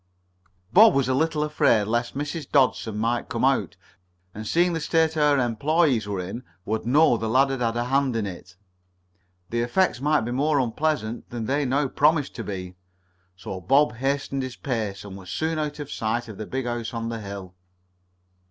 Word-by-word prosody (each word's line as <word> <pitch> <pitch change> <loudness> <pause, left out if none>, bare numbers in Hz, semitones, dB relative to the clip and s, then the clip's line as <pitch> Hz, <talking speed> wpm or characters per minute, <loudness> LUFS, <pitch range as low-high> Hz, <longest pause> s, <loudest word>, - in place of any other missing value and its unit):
Bob 220 -2 +8
was 135 -3 +2
a 130 - +1
little 155 +2 +1
afraid 145 -7 +3
lest 120 +4 -1
Mrs. 145 0 -4
Dodson 125 -5 +2
might 115 +2 -1
come - - 0
out, - - +1 0.6
and 110 +1 -7
seeing 175 +5 +2
the 165 - -1
state 160 +1 +2
her 150 -2 +3
employees 130 - +1
were 100 -2 -3
in, 95 +7 -5 0.2
would 110 +2 -2
know 140 -1 +5
the 110 0 -3
lad 135 +4 +3
had 135 -2 -3
had 115 -1 0
a 120 - 0
hand 135 0 +1
in 110 -2 -1
it. 90 -1 -9 1.0
The 120 0 0
effects 120 +2 +1
might 150 +1 +2
be 120 +2 -3
more 145 +3 +1
unpleasant 125 -2 -1
than 120 -2 -4
they 140 +4 0
now 135 +2 +1
promised 145 +2 +2
to - - -4
be. 90 -2 -6 0.6
So 95 0 -7
Bob 135 - +3
hastened 135 +1 -1
his 130 -1 -5
pace, 110 -7 -3
and 100 -2 -8
was 95 -2 -11
soon 160 - -1
out 150 -1 -3
of 145 -2 -7
sight 115 +2 -2
of 105 -3 -10
the 110 - -5
big 130 -1 -3
house 120 -1 -3
on 115 0 -3
the 115 -1 -4
hill. 100 -2 -8
125 Hz, 190 wpm, -25 LUFS, 110-145 Hz, 1.0 s, Bob